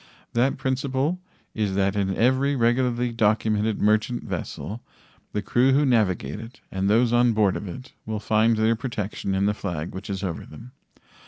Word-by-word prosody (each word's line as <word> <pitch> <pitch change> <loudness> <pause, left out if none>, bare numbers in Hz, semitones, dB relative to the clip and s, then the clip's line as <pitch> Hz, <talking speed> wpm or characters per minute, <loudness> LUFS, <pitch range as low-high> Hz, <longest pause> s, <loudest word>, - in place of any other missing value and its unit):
That 125 +3 +2
principle 135 +5 -1 0.3
is 105 -4 -1
that 100 0 +1
in 95 -2 0
every 130 +4 +2
regularly 120 0 +1
documented 110 -1 +1
merchant 110 +3 +1
vessel 110 +4 -5 0.5
the 105 - -2
crew 130 +5 +3
who 145 +2 +4
navigate 100 - +1
it 115 +2 -11
and 95 +1 0
those 115 +2 +3
on 120 -1 +4
board 105 -3 +2
of 100 - -5
it 130 +8 -9
will 110 -1 -2
find 110 +2 +2
their 110 +1 +3
protection 110 -5 -3
in 95 +1 +1
the 105 - +2
flag 85 -6 -4
which 95 +2 -7
is 95 0 -3
over 85 -4 -3
them. 115 +11 -12
110 Hz, 170 wpm, -24 LUFS, 100-125 Hz, 0.5 s, who